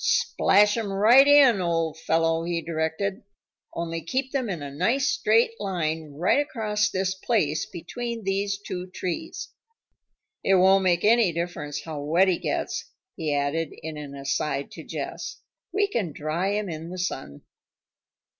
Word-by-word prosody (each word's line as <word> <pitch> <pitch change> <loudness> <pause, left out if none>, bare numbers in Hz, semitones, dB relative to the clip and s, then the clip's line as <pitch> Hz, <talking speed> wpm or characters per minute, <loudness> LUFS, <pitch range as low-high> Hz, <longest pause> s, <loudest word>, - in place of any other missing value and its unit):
"Splash 210 - +3
'em 215 -3 -2
right 230 +8 +6
in, 275 -8 +6
old 165 -2 0
fellow," 165 0 +1
he 170 0 -1
directed. 165 +5 -2 0.5
"Only 165 0 -3
keep 260 - -2
them 260 -5 -1
in 170 -6 -4
a 140 - -6
nice 230 - +1
straight 225 +2 +3
line 160 -6 -2
right 175 - +2
across 215 -7 0
this 190 -1 -1
place 190 -7 0
between 235 +6 -6
these 200 +1 -1
two 185 -2 -6
trees. 180 -1 -5 0.9
It 195 - +4
won't 190 +1 +5
make 175 -2 +2
any 225 -3 +5
difference 155 -3 -4
how 155 -3 -6
wet 170 +6 +3
he 180 - +1
gets," - - -2 0.3
he 160 -4 -2
added 145 +2 -1
in 160 0 -5
an 145 -2 -8
aside 140 0 -2
to - - -9
Jess. - - -6 0.3
"We 405 +2 +2
can 205 - -2
dry 155 +6 -2
him 205 0 -1
in 165 -1 -6
the 185 - -7
sun." 135 - -4
180 Hz, 155 wpm, -25 LUFS, 160-210 Hz, 0.9 s, right